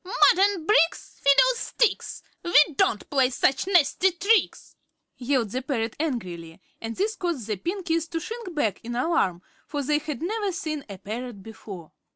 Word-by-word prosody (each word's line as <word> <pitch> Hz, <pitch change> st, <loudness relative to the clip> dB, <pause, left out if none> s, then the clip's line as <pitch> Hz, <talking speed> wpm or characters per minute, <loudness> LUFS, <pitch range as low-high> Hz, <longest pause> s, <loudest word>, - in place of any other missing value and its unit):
"Mud 385 Hz, +6 st, -7 dB, 0.2 s
and 390 Hz, -3 st, +2 dB
bricks 335 Hz, -4 st, +1 dB
fiddlesticks! 475 Hz, -, +2 dB, 0.2 s
We 345 Hz, -, +3 dB, 0.2 s
don't 215 Hz, -, +1 dB
play 265 Hz, -3 st, +3 dB
such 265 Hz, +5 st, +1 dB
nasty 360 Hz, 0 st, +3 dB
tricks," 390 Hz, +3 st, 0 dB, 0.4 s
yelled 245 Hz, -4 st, -1 dB
the 255 Hz, -, -2 dB
parrot, 235 Hz, -4 st, -2 dB
angrily, 180 Hz, -, -4 dB, 0.2 s
and 225 Hz, 0 st, -5 dB
this 430 Hz, +3 st, -1 dB
caused 340 Hz, -, -3 dB
the 215 Hz, -2 st, -3 dB
Pinkies 335 Hz, -, -2 dB
to 330 Hz, -, -3 dB
shrink 445 Hz, -1 st, -7 dB
back 220 Hz, -10 st, -1 dB
in 240 Hz, +1 st, -5 dB
alarm, 240 Hz, -, 0 dB, 0.2 s
for 290 Hz, -1 st, -3 dB
they 295 Hz, +2 st, +1 dB
had 305 Hz, 0 st, -6 dB
never 410 Hz, +2 st, -1 dB
seen 310 Hz, -5 st, -4 dB
a 200 Hz, -, -7 dB
parrot 215 Hz, +1 st, -7 dB
before. 195 Hz, -6 st, -10 dB
295 Hz, 160 wpm, -25 LUFS, 230-360 Hz, 0.4 s, We